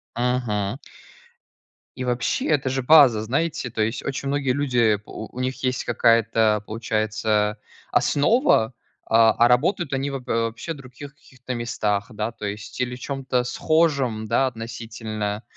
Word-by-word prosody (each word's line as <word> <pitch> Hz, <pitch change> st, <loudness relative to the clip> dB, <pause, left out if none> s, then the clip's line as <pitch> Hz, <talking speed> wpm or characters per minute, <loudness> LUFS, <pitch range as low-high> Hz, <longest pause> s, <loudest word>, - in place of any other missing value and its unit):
Ага. 120 Hz, -3 st, -1 dB, 1.2 s
И, 130 Hz, -, -4 dB
вообще, 125 Hz, -1 st, -1 dB
это 145 Hz, -4 st, +1 dB
же 135 Hz, 0 st, -1 dB
база, 130 Hz, -6 st, +6 dB
знаете? 135 Hz, +2 st, -1 dB
То 110 Hz, -, -1 dB
есть, 110 Hz, +3 st, -2 dB
очень 140 Hz, 0 st, -3 dB
многие 140 Hz, -2 st, 0 dB
люди, 125 Hz, -6 st, +2 dB
э, -, -, -13 dB
у 110 Hz, -, -8 dB
у -, -, -4 dB
них 130 Hz, +1 st, -3 dB
есть 130 Hz, 0 st, 0 dB
какая-то, 115 Hz, -2 st, +3 dB
получается, 110 Hz, -1 st, -1 dB, 0.3 s
основа, 145 Hz, -, +3 dB, 0.3 s
а 115 Hz, 0 st, +5 dB
а 120 Hz, +1 st, +4 dB
работают 155 Hz, +7 st, +1 dB
они 135 Hz, +1 st, -1 dB
воб 130 Hz, -2 st, -6 dB
э, -, -, 0 dB
вообще 115 Hz, +7 st, -2 dB
в -, -, -12 dB
других 135 Hz, +2 st, -11 dB
каких-то 130 Hz, -2 st, -9 dB
местах, 105 Hz, -3 st, -1 dB
да, 110 Hz, 0 st, -3 dB
то 110 Hz, -, -10 dB
есть, 105 Hz, +1 st, -6 dB
или 125 Hz, 0 st, -1 dB
в 125 Hz, -, -11 dB
чём-то 130 Hz, -2 st, -2 dB
схожем, 140 Hz, -6 st, +1 dB
да, 125 Hz, +4 st, +2 dB
относительно. 115 Hz, -2 st, -5 dB
120 Hz, 155 wpm, -23 LUFS, 110-135 Hz, 1.2 s, база